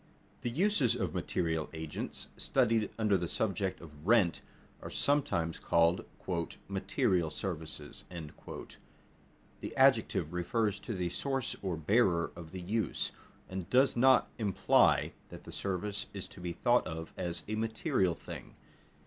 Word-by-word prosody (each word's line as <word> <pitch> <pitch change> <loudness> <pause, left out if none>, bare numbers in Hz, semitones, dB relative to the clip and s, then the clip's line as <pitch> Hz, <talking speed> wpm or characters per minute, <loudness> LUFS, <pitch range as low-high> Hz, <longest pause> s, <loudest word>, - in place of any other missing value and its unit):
_ - - -32
The 120 - -1
uses 160 - +2
of - - -2
material 80 -3 -1
agents, 80 -1 -5
studied 115 -5 +2
under 105 -3 +3
the 85 - -2
subject 95 0 -1
of 75 0 -12
rent, 105 -7 +4 0.4
are - - -6
sometimes 85 - +1
called 85 +2 +3 0.6
"material 85 -4 +1
services." 80 -3 -5
The 80 -4 -11
adjective 80 - +4
refers 105 +4 0
to 115 - -5
the 90 -2 -1
source 135 +6 -1
or 95 -4 -2
bearer 85 0 +3
of 85 -2 -9
the 95 - -6
use, 105 +5 -1 0.4
and 95 -2 -5
does 130 +2 +4
not 130 +1 +6
imply 100 -4 +4 0.2
that - - -10
the - - -10
service 100 +1 -2
is 95 - -5
to - - -12
be 85 -1 -3
thought 120 +7 +3
of 80 +1 -6
as 85 -1 -3
a 110 - -3
material 110 - +1
thing. - - -9
95 Hz, 140 wpm, -32 LUFS, 85-115 Hz, 0.6 s, not